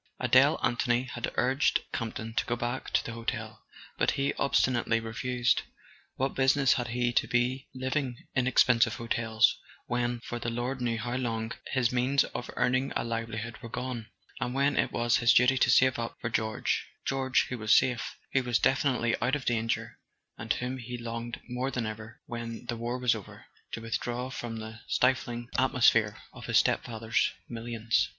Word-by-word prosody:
Adele - - +5
Anthony 120 0 +2
had 120 -2 -4
urged 130 +3 +2
Campton 115 -1 -4
to - - 0
go 120 - 0
back 120 +2 -3
to - - +1
the - - -4
hotel, 115 -1 -4 0.4
but - - +3
he 140 0 +1
obstinately 120 -4 +2
refused. 120 +1 0 0.5
What 135 +1 -1
business 135 0 +4
had 120 -2 -2
he 120 +1 0
to - - +2
be 125 +2 0
living 130 -1 -2 0.2
in 130 -1 +1
expensive 120 -3 +4
hotels 115 -1 +2 0.3
when, 120 0 -1
for 120 +1 -5
the 120 - -2
Lord 125 +3 -3
knew 120 -2 0
how 120 +2 -3
long, 115 -3 -2 0.2
his 125 -3 +1
means 130 +3 +3
of 120 - -6
earning 130 +2 +1
a - - 0
livelihood 115 -1 -4
were 115 - -8
gone, 125 -2 -4 0.3
and 125 +2 -2
when 140 +1 +2
it - - +1
was 120 0 +2
his 120 -1 +4
duty 125 +2 +5
to 120 - +4
save 130 0 +5
up 115 - -4
for 115 - -3
George—George, 125 +4 0
who 125 - -4
was 110 0 +4
safe, 125 -2 0 0.2
who 135 - +4
was 125 -2 +1
definitely 125 -3 +2
out 125 +4 +2
of 145 - -5
danger, 115 -1 -1 0.4
and 110 +1 -5
whom 125 +1 -3
he 125 +1 -6
longed 115 0 -5
more 125 +2 -2
than 125 -4 -2
ever, 110 +1 -7
when 115 0 -6
the 120 - -3
war 120 +2 -3
was 125 -2 +3
over, 110 -4 -9 0.3
to 115 - -5
withdraw 120 +3 -3
from 120 -3 -5
the 110 0 -8
stifling 120 -2 +1
at¬ 130 +1 +3
mosphere 115 -4 +4 0.2
of - - -10
his - - +3
stepfather's 115 0 +1 0.2
millions? 115 -1 -1
120 Hz, 175 wpm, -29 LUFS, 115-125 Hz, 0.5 s, Adele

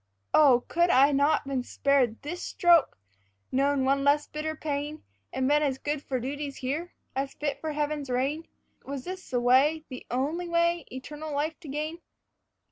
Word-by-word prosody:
Oh, 265 -5 +6
could 345 +1 +2
I 280 -2 +6
not 285 +1 +2
been 270 -2 -1
spared 260 -2 +1
this 345 +5 -5
stroke, 345 - +3 0.5
known 275 0 +2
one 275 +1 +2
less 290 +1 +3
bitter 310 +1 -4
pain, 300 0 -4 0.3
And 260 0 0
been 295 +1 +4
as 275 -3 0
good 290 +1 -3
for 260 -3 -3
duties 280 +3 -4
here, 300 +7 -4 0.2
as 270 +1 -2
fit 285 -2 -3
for 315 -1 -3
heaven's 295 -2 -2
reign? 275 +6 -1 0.4
Was 275 -2 -6
this 370 +3 -7
the 250 - 0
way, 270 +6 +4
the 255 - -9
only 305 +8 -1
way, 340 -2 +1
eternal 295 +4 -7
life 300 +3 -2
to 340 - -12
gain? 305 +4 -4
290 Hz, 170 wpm, -28 LUFS, 270-310 Hz, 0.5 s, Oh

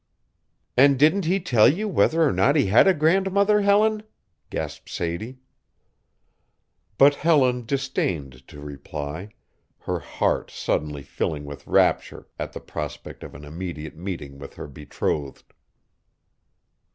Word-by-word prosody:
"And 140 +2 +5
didn't 160 +7 +3
he 185 +4 +1
tell 120 - +4
you 210 +8 -3
whether 165 -4 +2
or 150 - +2
not 110 - +3
he 145 - +3
had 105 - +5
a 190 - +6
grandmother, 195 +6 +3
Helen?" 210 +2 +3 0.5
gasped - - -6
Sadie. 90 +10 -4 1.6
But 140 +1 +7
Helen 130 -6 +2
disdained 85 - -3
to 75 - -12
reply, 75 +5 -7 0.5
her - - -3
heart - - -1
suddenly 75 -2 -3
filling 75 +1 -3
with 70 0 -10
rapture - - +1
at - - -5
the - - -6
prospect - - -7
of - - -10
an 75 +2 -10
immediate 80 -1 -7
meeting 80 -6 -7
with 70 - -10
her - - -7
betrothed. 70 0 -5
115 Hz, 125 wpm, -24 LUFS, -, 1.6 s, But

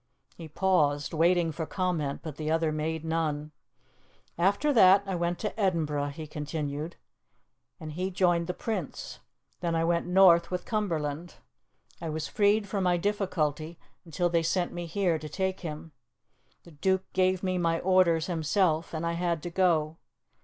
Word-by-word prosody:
He 165 - -9
paused, 150 -4 +1
waiting 170 +1 +3
for 160 0 -5
comment, 170 -7 -2
but 155 -3 -7
the 155 0 -3
other 160 0 +1
made 160 +1 -3
none. 155 -2 -2 0.8
"After 200 - +2
that 195 -4 +6
I 195 - -3
went 175 0 -1
to 215 +1 -5
Edinburgh," 155 -7 0
he 155 +2 -7
continued, 150 +1 -4 0.8
"and 155 -2 -7
he 180 +5 -2
joined 175 -2 +1
the 180 - -3
Prince. 205 -10 -5 0.4
Then 170 -1 -1
I 165 - +1
went 170 +1 0
north 180 -2 +5
with 180 -1 -3
Cumberland. 170 -6 -2 0.7
I 165 - -4
was 155 0 -3
freed 205 0 +2
from 195 -1 -2
my 175 -1 +3
difficulty 170 -5 -1 0.3
until 175 +1 -1
they 170 -1 +1
sent 175 +2 -1
me 175 -1 -5
here 175 -2 0
to 155 0 -8
take 190 +3 -2
him. 160 -1 -7 0.7
The 170 - -15
Duke 190 +5 0
gave 185 0 +2
me 185 -1 0
my 165 -1 +1
orders 180 -4 +3
himself, 165 0 0
and 160 +1 -3
I 170 - 0
had 170 -2 -1
to 175 - -5
go. 165 -4 +1
170 Hz, 160 wpm, -28 LUFS, 155-185 Hz, 0.8 s, that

